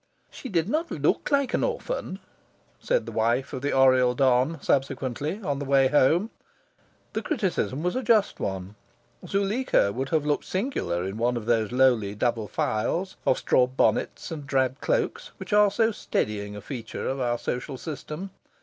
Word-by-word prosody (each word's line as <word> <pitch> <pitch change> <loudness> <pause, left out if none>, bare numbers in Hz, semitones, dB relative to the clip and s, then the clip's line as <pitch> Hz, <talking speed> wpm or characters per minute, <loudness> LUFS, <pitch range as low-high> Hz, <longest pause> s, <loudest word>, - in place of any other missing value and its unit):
"She 260 - -8
did 170 -4 +1
not 315 +8 -1
look 145 -1 0
like 280 -2 +1
an - - +1
orphan," 485 - -3 0.6
said - - 0
the - - -6
wife 120 +5 0
of 130 - -4
the 145 - -1
Oriel 130 -2 +4
don, 130 +4 +2
subsequently, 135 - -1
on 145 -5 -1
the - - -3
way 135 -1 +4
home. 160 - +3 0.8
The - - -1
criticism 190 - -1
was 180 - 0
a 255 - 0
just 220 -5 +2
one. 95 0 -4 0.5
Zuleika 200 - +1
would 135 +3 -3
have 155 -3 +1
looked 150 -1 0
singular 185 - -2
in 95 +3 -4
one 120 +1 +1
of 110 - -5
those 115 -2 +1
lowly 120 -6 +3
double 115 -1 0
files 170 - -1
of - - +4
straw 125 - +3
bonnets 130 +6 0
and 150 -4 -6
drab 130 -1 0
cloaks - - -1
which - - -6
are 210 0 +6
so 225 +3 +2
steadying 105 - -2
a 105 - -7
feature 115 0 -6
of 135 - -2
our 120 -2 0
social 125 +3 -4
system. 155 +6 -6
135 Hz, 170 wpm, -26 LUFS, 120-190 Hz, 0.8 s, are